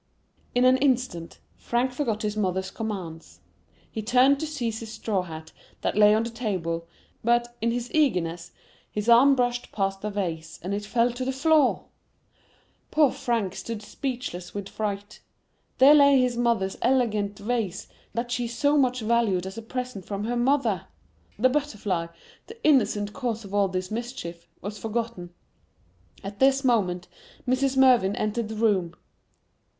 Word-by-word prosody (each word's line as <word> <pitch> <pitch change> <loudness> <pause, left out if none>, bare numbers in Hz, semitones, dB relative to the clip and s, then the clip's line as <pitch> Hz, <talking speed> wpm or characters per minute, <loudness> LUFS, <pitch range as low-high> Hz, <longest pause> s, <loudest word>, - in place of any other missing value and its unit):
In 245 +1 +4
an 255 0 +6
instant, 250 -11 0 0.2
Frank 245 +2 0
forgot 235 -5 -2
his 210 0 -1
mother's 190 -2 -1
commands. 185 -8 -6 0.5
He 220 - -4
turned 255 +5 +4
to 315 - -3
seize 240 -7 -3
his 225 -1 -8
straw 210 -4 -1
hat 160 -3 -9 0.3
that - - -1
lay 210 0 +6
on 220 - +1
the 230 - -4
table; 180 -8 -3 0.4
but, 240 +1 +1
in 230 - +1
his 240 +1 -3
eagerness, 175 - +1 0.4
his 210 +1 -4
arm 255 +4 +7
brushed 245 -1 -1
past 195 -1 -1
the 210 - -2
vase, 165 -6 -4
and 190 +3 -3
it 205 +1 -3
fell 235 +2 +2
to 245 +2 -5
the 260 - -1
floor! 290 0 +3 1.0
Poor 300 -4 +4
Frank 235 -8 -1
stood 220 +1 -6
speechless 240 -9 -5
with 200 -1 -5
fright,—there 210 +6 0
lay 280 -2 +6
his 250 -1 +1
mother's 235 -5 0
elegant 215 -5 +1
vase, 210 -3 -2 0.3
that 240 +1 -2
she 245 -1 -1
so 285 +5 +2
much 255 -2 +1
valued 220 -5 +1
as 190 +1 -6
a 225 - -6
present 250 -3 -5
from 200 +2 -4
her 240 +3 -1
mother! 240 - +1 0.5
The 255 +5 +4
butterfly, 210 - -1 0.4
the 445 - -11
innocent 215 -8 +3
cause 230 -4 -3
of 200 - -10
all 200 -1 +3
this 185 0 -4
mischief, 215 -8 -6
was 205 +1 -6
forgotten. 225 -5 -3 0.9
At 200 +1 -7
this 270 +1 +4
moment, 180 -8 +1 0.4
Mrs. 265 +1 +1
Mervyn 245 -7 +5
entered 215 +1 -2
the 220 - -5
room. 195 -6 +1
225 Hz, 155 wpm, -26 LUFS, 195-250 Hz, 1.0 s, arm